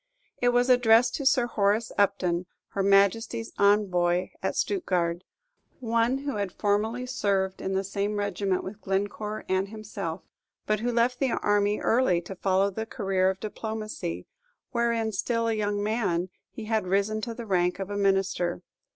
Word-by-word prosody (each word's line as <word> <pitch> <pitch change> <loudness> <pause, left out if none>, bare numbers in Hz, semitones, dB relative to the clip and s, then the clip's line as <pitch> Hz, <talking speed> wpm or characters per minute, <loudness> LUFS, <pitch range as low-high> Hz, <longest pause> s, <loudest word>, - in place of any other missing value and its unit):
It 245 - +4
was 245 +1 +3
addressed 245 -1 +5
to 275 - 0
Sir 265 -3 +4
Horace 215 0 +1
Upton, 185 -3 +1 0.2
Her 200 - -2
Majesty's 200 +4 +2
Envoy 185 -3 +3
at - - -1
Stuttgard, 180 - 0 0.6
one 230 +1 +1
who 280 -3 -4
had 200 -2 -2
formerly 220 +4 0
served 200 -6 -1
in 190 - -2
the 190 - +1
same 200 +2 -2
regiment 200 -2 -1
with 200 +2 -8
Glencore 205 +2 -2
and 190 +1 +1
himself, 200 -5 -6 0.4
but 215 -1 +1
who 240 +3 -1
left 240 +1 +1
the 270 - +2
army 205 0 +1
early 225 -7 +2
to 185 +3 -8
follow 195 +2 +1
the 220 +3 -4
career 195 -5 +1
of 190 0 -3
diplomacy, 215 -5 -5 0.5
wherein, 235 -2 0
still 230 +3 -1
a 225 - +1
young 205 -1 -1
man, 200 -5 0 0.2
he 225 - -8
had 220 -3 0
risen 200 +3 +1
to 230 0 -4
the 235 - -7
rank 180 -3 +1
of 195 +1 -5
a - - -3
minister. 195 -3 0
205 Hz, 160 wpm, -27 LUFS, 190-230 Hz, 0.6 s, addressed